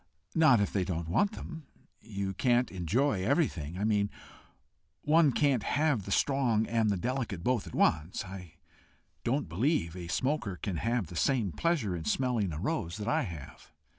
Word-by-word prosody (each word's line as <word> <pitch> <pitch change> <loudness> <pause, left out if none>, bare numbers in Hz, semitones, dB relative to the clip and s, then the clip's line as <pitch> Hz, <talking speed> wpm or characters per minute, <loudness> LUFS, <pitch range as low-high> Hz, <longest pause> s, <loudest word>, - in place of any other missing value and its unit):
"Not 155 -8 +5
if 100 - 0
they 95 - +1
don't 85 -3 -3
want 200 - +2
them. 160 -6 -8 0.3
You 100 -2 -4
can't 120 +3 +2
enjoy 95 - 0
everything 95 - 0
I 100 - -2
mean, 105 -2 +2 0.9
one 155 -1 +5
can't 135 -2 +2
have 145 -5 +1
the 100 - -6
strong 120 -4 +2
and 115 -2 +1
the 100 - +1
delicate 115 -4 -3
both 125 -2 0
at - - -8
once. 80 +6 +1
I 90 -3 -9 0.7
don't 130 -1 0
believe 90 - 0
a 90 -2 -6
smoker 130 - -1
can 90 -1 -4
have 115 +2 0
the 85 - -10
same 115 - +1
pleasure 140 - 0
in 80 -2 -6
smelling 120 - 0
a 75 - -5
rose 100 - -2
that 105 - -5
I - - +2
have." 80 -7 -8
110 Hz, 170 wpm, -30 LUFS, 90-135 Hz, 0.9 s, Not